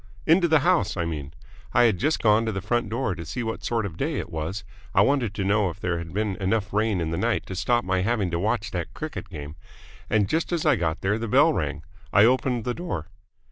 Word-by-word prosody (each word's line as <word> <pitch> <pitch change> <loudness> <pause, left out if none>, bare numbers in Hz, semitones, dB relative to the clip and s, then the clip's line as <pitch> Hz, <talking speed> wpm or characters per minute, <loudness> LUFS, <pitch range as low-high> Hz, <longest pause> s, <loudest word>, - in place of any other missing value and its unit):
"Into 170 +2 +5
the 160 -3 +4
house, 175 - +2
I 85 - 0
mean. 75 -4 -4 0.4
I 120 - +6
had 110 -6 +3
just 155 +4 0
gone 110 0 +5
to - - +1
the 95 - -3
front 110 +2 -1
door 115 -2 -1
to 85 -2 -7
see 120 +10 -4
what 115 0 -4
sort 115 -2 0
of 95 - -5
a - - -15
day - - -1
it - - -5
was 80 +7 -4 0.3
I - - +6
wanted 130 -7 +2
to 100 - -1
know 100 0 +2
if 85 +2 -9
there 90 -3 -1
had 85 -1 -7
been 105 -1 -1
enough 100 +1 -1
rain 105 -2 +1
in 80 -1 -2
the 80 - -2
night - - 0
to 95 - -6
stop 120 +4 +1
my 95 0 +1
having 100 -3 0
to 85 - -1
watch 110 +3 -1
that 90 -2 -4
cricket 155 -10 -6
game 75 -3 -8 0.5
and 105 -3 +2
just 160 - -1
as 170 -2 -1
I 150 -3 +5
got 85 -5 -2
there 105 +3 0
the 115 - -3
bell - - +5
rang. - - -2 0.3
I 100 - +6
opened 125 -1 +2
the 125 - 0
door." 110 - -5
105 Hz, 255 wpm, -25 LUFS, 90-120 Hz, 0.5 s, I